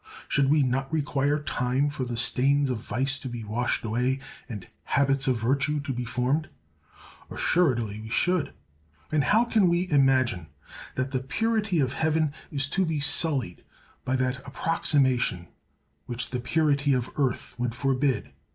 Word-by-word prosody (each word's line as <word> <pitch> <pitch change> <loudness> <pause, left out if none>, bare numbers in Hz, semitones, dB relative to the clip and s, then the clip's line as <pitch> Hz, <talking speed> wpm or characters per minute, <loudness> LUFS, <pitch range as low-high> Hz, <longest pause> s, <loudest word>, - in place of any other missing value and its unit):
Should 140 -1 +2
we 150 0 +4
not 135 +2 -1
require 145 -2 +1
time 135 0 0
for 140 -3 -4
the 120 -1 -4
stains 135 +3 +3
of 120 - -2
vice 135 +6 0
to 130 - -6
be 120 -2 -6
washed 115 +4 -1
away 125 +4 0 0.3
and 105 -6 -7 0.2
habits 135 -1 +2
of 130 -2 +2
virtue 140 +6 +1
to 140 -1 -4
be 125 0 -4
formed? 125 +6 -1 0.8
Assuredly 120 - +1
we 110 - -9
should! 175 +2 +1 0.6
And 155 -2 +2
how 225 +3 +4
can 215 -6 +3
we 175 +2 +1
imagine 130 - +2 0.5
that 130 +1 -2
the 130 - 0
purity 210 - 0
of 130 -2 +1
heaven 155 -1 +1 0.2
is 140 -2 -1
to 190 +5 +1
be 160 -4 -1
sullied 140 - +1 0.4
by 130 - 0
that 130 0 0
approximation 130 - +1 0.6
which 120 0 -3
the 125 - -2
purity 145 +1 +1
of 125 -2 -1
earth 135 -4 -1
would 120 -1 -2
forbid? 135 0 0
135 Hz, 155 wpm, -26 LUFS, 125-150 Hz, 0.8 s, we